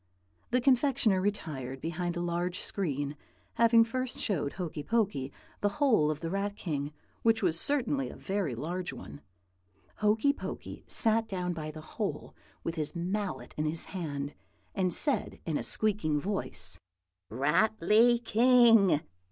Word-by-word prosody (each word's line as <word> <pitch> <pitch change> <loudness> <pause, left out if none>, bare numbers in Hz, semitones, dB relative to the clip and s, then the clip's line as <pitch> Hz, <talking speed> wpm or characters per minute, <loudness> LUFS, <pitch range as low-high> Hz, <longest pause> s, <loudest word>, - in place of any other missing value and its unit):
"The 250 - +2
confectioner 255 -6 +3
retired 145 -10 -3
behind 170 +3 -3
a - - -1
large 175 +1 -1
screen, 145 -6 -2 0.4
having 230 0 +6
first 255 +2 -3
showed 150 -8 -1
Hokey 165 -5 -4
Pokey 195 - 0 0.3
the 205 - +2
hole 225 - +4
of 155 -1 -3
the 165 -1 -3
Rat 200 +1 -1
King, 145 -7 -3 0.3
which 225 -1 +3
was 170 -2 +2
certainly 275 +1 +1
a - - -9
very 190 -10 -2
large 175 +8 -3
one. 145 - -10 0.8
Hokey 215 +7 +3
Pokey - - -7
sat 225 -1 +2
down 180 -3 -2
by 155 -2 -5
the 155 0 -8
hole, 155 - -4 0.3
with 165 - -2
his 155 0 -3
mallet 190 +3 -3
in 155 - 0
his 155 +2 -2
hand, 145 -6 -4 0.4
and 185 -2 +1
said 285 - 0
in 160 - -1
a - - 0
squeaking 200 -9 +1
voice, 95 - -1 0.5
'Ratly 215 - +3
King! 225 - +6
185 Hz, 145 wpm, -30 LUFS, 155-225 Hz, 0.8 s, having